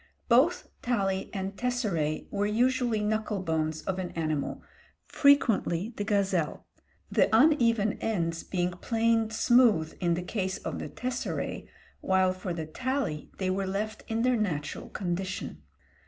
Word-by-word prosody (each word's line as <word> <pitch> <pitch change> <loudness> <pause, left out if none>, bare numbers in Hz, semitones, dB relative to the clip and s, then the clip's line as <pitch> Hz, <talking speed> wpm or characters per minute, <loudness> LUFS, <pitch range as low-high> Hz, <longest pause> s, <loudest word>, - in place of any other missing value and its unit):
Both 270 +9 +4
tali 195 -6 0
and 195 0 -4
tesseræ 205 - -1
were 205 0 0
usually 240 0 +1
knuckle 215 -1 -1
bones 160 -2 -1
of 190 -1 -2
an 180 -1 -3
animal, 155 -3 -2 0.4
frequently 230 - +3
the 205 - -2
gazelle; 195 -6 0 0.5
the - - +3
uneven 230 -4 +4
ends 170 -6 -1
being 180 -1 -1
planed 225 +3 +1
smooth 220 -8 +4
in 170 -2 +1
the 175 - -3
case 190 0 -2
of - - -5
the - - -5
tesseræ, 250 0 -4 0.3
while 190 -1 +2
for 185 0 -5
the 165 -2 -3
tali 255 - -2
they 185 -1 0
were 195 0 -1
left 215 +3 -3
in 225 0 -1
their 255 0 +3
natural 150 -9 -3
condition. 185 +1 -4
200 Hz, 140 wpm, -28 LUFS, 175-230 Hz, 0.5 s, Both